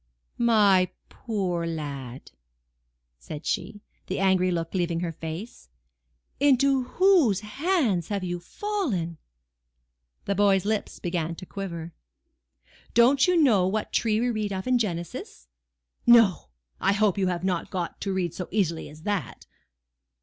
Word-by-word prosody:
"My 205 -6 +4 0.2
poor 185 -7 -2
lad!" 140 -6 -6 0.9
said 145 - -8
she, 205 - -3 0.3
the 185 - -2
angry 190 -1 +3
look 165 -2 -2
leaving 175 -2 -1
her 175 -2 -2
face, 165 - -8 0.7
"into 275 -1 +3
whose 350 - +4
hands 245 - 0
have 200 -2 -2
you 175 -1 -3
fallen?" 195 - -3 1.1
The - - 0
boy's 200 -1 +3
lips 215 0 -2
began 170 -2 -2
to 185 - -10
quiver. 170 -4 -6 1.0
"Don't 260 +7 +5
you 360 -1 +3
know 220 - +4
what 210 +2 -2
tree 220 -2 +2
we 245 +1 +1
read 215 -2 -2
of 190 -1 -4
in 255 -1 +2
Genesis?—No! 115 - 0 0.3
I - - +2
hope 205 -1 +2
you 190 - +2
have 180 -1 -2
not 185 -3 -1
got 175 -3 -4
to 195 - -2
read 180 -3 -1
so 180 0 -5
easily 175 -5 -1
as 155 +1 -14
that." 205 -3 -3
190 Hz, 135 wpm, -26 LUFS, 170-220 Hz, 1.1 s, Don't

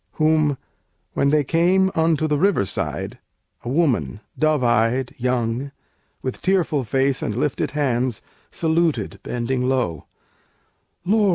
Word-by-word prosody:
Whom, 155 -2 +2 0.6
when 140 - +2
they 150 0 +3
came 180 +6 +3
unto 160 -1 +2
the 150 -2 +1
river 190 - +3
side, - - -4 0.4
A - - -4
woman 135 -7 +1 0.2
dove 155 -3 +2
eyed, 120 +2 +2
young, 125 +2 -1 0.5
with 130 - -4
tearful 170 -7 +1
face 135 +3 +1
And 105 - -2
lifted 140 +2 0
hands 125 -5 0 0.3
saluted, 160 - 0
bending 125 +1 -1
low: 120 - -1 1.0
"Lord! 210 +1 +3
140 Hz, 120 wpm, -22 LUFS, 125-160 Hz, 1.0 s, they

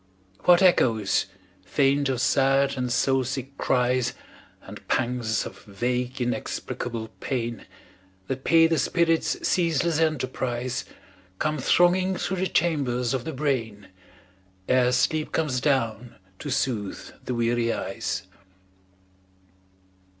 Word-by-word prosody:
What 175 +1 +6
echoes 115 - +3 0.4
faint 135 +8 +2
of 130 -2 -1
sad 135 +1 +3
and 125 -2 -2
soul 130 +2 +2
sick 135 +2 -5
cries, 125 -1 +1 0.5
And - - -11
pangs 120 -2 0
of - - -9
vague 125 +5 -2
inexplicable 120 -1 -3
pain 120 -4 -3 0.6
That 135 +3 -4
pay 165 0 +5
the 165 -2 +2
spirit's 165 +2 +1
ceaseless 165 -2 +1
enterprise, 130 -4 -1 0.5
Come 155 +3 -1
thronging 180 +6 +3
through 190 - -2
the 185 +1 0
chambers 135 -9 0
of 130 -2 -2
the - - -3
brain 120 -9 -2 0.8
Ere 125 -1 +3
sleep 155 +5 +1
comes 145 -6 0
down 120 -4 0 0.2
to 145 - -6
soothe 125 -7 -2
the 125 - -2
weary 120 0 +1
eyes. - - -3
130 Hz, 115 wpm, -25 LUFS, 120-150 Hz, 0.8 s, What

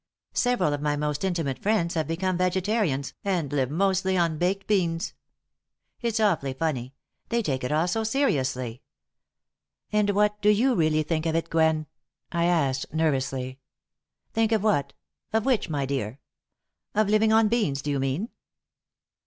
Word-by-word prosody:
Several 245 -12 +2
of 145 - -3
my 150 0 +1
most 150 +1 -2
intimate 165 -8 -1
friends 195 -5 +1
have 160 -2 -1
become 185 +3 -1
vegetarians 185 - 0
and 175 -8 -1
live 135 -3 +1
mostly 190 +3 +1
on 165 -3 +1
baked 195 +2 0
beans. 170 -5 0 0.9
It's 230 -2 0
awfully 170 -11 +1
funny 135 -3 -2 0.3
they 235 0 +1
take 130 -7 -2
it 125 - -2
all 155 +3 +2
so 225 +5 0
seriously." 130 - 0 1.1
"And 210 -1 +2
what 210 0 +2
do 210 - +4
you 235 +6 +4
really 155 -5 +2
think 160 +1 -1
of 160 - 0
it, 165 - -1
Gwen?" 160 -1 +2 0.5
I 170 0 +1
asked, 140 -7 +1
nervously. 135 -4 -1 0.7
"Think 225 0 +2
of 220 -3 +2
what, 205 -10 +1 0.4
of 220 -1 +1
which, 255 -9 +1
my 145 -3 -1
dear? 130 -2 -3 0.8
Of 215 0 +3
living 215 +1 +3
on 220 0 +5
beans, 205 - 0
do 145 - -1
you 140 - 0
mean?" 135 - -1
165 Hz, 155 wpm, -26 LUFS, 145-210 Hz, 1.1 s, on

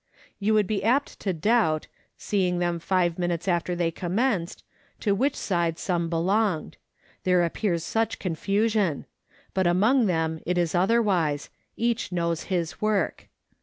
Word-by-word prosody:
You 215 +2 +2
would 210 -1 +4
be 205 +1 -2
apt 255 +6 +1
to 195 - -1
doubt, 170 -3 +2 0.3
seeing 185 -3 0
them 175 -1 0
five 175 -1 0
minutes 175 0 -1
after 175 0 0
they 170 -1 0
commenced, 180 +1 -1 0.4
to 205 - +2
which 265 +8 +1
side 170 -4 -1
some 170 -3 -1
belonged 180 +1 0 0.5
there 180 -3 +3
appears 170 -1 -1
such 225 +4 -1
confusion; 200 0 0 0.5
but 190 -2 +2
among 215 +8 +3
them 160 -2 0
it 180 +1 -1
is 170 -2 +1
otherwise 180 -7 +1 0.3
each 235 -3 -1
knows 170 -2 -1
his 175 -4 -2
work. 215 -2 0
180 Hz, 140 wpm, -26 LUFS, 170-210 Hz, 0.5 s, would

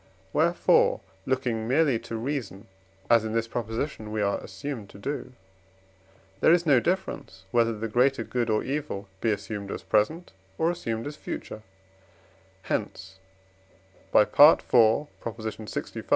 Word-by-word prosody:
wherefore, - - +3 0.3
looking 125 -4 -1
merely 135 -2 +3
to 115 0 -7
reason, 115 -5 -4 0.4
as 115 -2 +5
in 110 0 -3
this 115 0 0
proposition 115 0 -4
we 110 - -2
are 100 -1 +1
assumed 105 +2 -7
to - - -13
do, 140 +5 -5 1.1
there - - +5
is 175 0 +4
no 140 -5 +5
difference, 175 - -3
whether 115 -2 +2
the 115 +2 -3
greater 125 +5 +2
good 120 -2 -2
or 110 -1 +1
evil 135 -8 -4
be 115 - +1
assumed 100 -1 -3
as - - -5
present, 155 +12 0 0.3
or 165 +2 +2
assumed 115 -10 -4
as 145 +1 -5
future; 110 - -7 1.0
hence 95 +1 -4 0.9
(IV. 105 - +4
lxv.) 115 -5 +2
115 Hz, 130 wpm, -27 LUFS, 110-140 Hz, 1.1 s, as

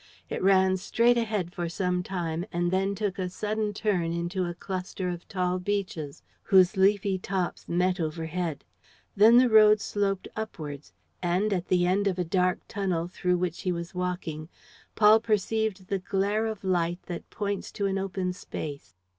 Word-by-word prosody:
It - - -2
ran 190 0 +4
straight 230 +5 +3
ahead 210 -6 -2
for 175 -1 -3
some 180 0 -1
time 175 -3 -3
and 175 0 0
then 195 +1 +1
took 200 -2 -2
a 185 -1 -1
sudden 210 +3 -2
turn 195 -5 0
into 175 +2 -2
a 175 0 -4
cluster 185 0 -4
of 175 -1 -6
tall 180 -1 -1
beeches 180 -7 -3 0.2
whose 190 -1 +4
leafy 195 0 +2
tops 185 -1 -3
met 180 +2 +1
overhead. 160 0 -3 0.5
Then 220 +4 +7
the 255 +1 +6
road 215 -2 +7
sloped 200 -2 -1
upwards; 155 -10 -6 0.3
and, 185 +4 +1
at 180 -2 -2
the 180 -1 +3
end 195 +3 +2
of 190 - +1
the 180 -1 -1
dark 180 +1 +1
tunnel 185 -4 -1
through 180 0 0
which 175 -2 -2
he 185 - 0
was 170 0 -5
walking, 175 -4 -4 0.5
Paul 215 0 +7
perceived 220 -2 0
the 195 +1 -2
glare 200 +4 0
of 215 -3 -5
light 175 -2 0
that 175 -2 -7
points 200 -2 -3
to 200 - -2
an 195 0 0
open 190 -1 -2
space. 150 - -7
185 Hz, 170 wpm, -27 LUFS, 175-200 Hz, 0.5 s, Then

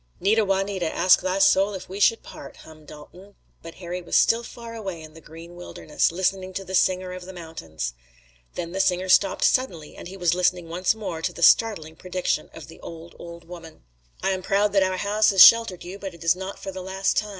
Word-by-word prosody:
"Nita, 215 +3 +2
Juanita! 195 -3 -1
Ask 180 +1 +4
thy 185 +1 -1
soul 195 +1 +3
if 190 - -8
we 190 +2 -8
should 225 +3 +3
part," - - -12
hummed 155 -1 -16
Dalton, 180 +7 -14 0.3
but 165 0 -11
Harry 180 0 -6
was 170 - -4
still 230 +1 +4
far 235 -1 -10
away 195 -7 -6
in 155 -1 -12
the 160 - -14
green 165 +3 -13
wilderness, 175 -3 -2
listening 190 +1 -2
to 195 - -5
the 190 - -9
singer 185 0 +1
of 180 -1 -9
the - - -8
mountains. 80 - -7 0.6
Then 170 -1 -5
the 190 - -4
singer 185 -1 0
stopped 195 +1 +3
suddenly, 175 -13 0
and - - -10
he 190 +2 -10
was 175 -3 +1
listening 180 -1 0
once 180 +5 0
more 185 -7 -6
to - - -2
the 170 - -5
startling 165 -7 +3
prediction 180 -2 -3
of 160 - -12
the 165 - -14
old, 165 0 -11
old 170 0 -11
woman: 165 - -12 0.4
"I 195 - +1
am 190 -1 -3
proud 200 +2 0
that 195 - +4
our 185 0 0
house 210 +2 +2
has 195 -2 +9
sheltered 230 -6 +4
you, 185 +3 -9
but 195 -3 -7
it 170 - -13
is 165 +1 +3
not 190 +1 -7
for 195 - -7
the 190 0 -8
last 190 +1 -2
time. 210 - 0
185 Hz, 225 wpm, -24 LUFS, 170-195 Hz, 0.6 s, has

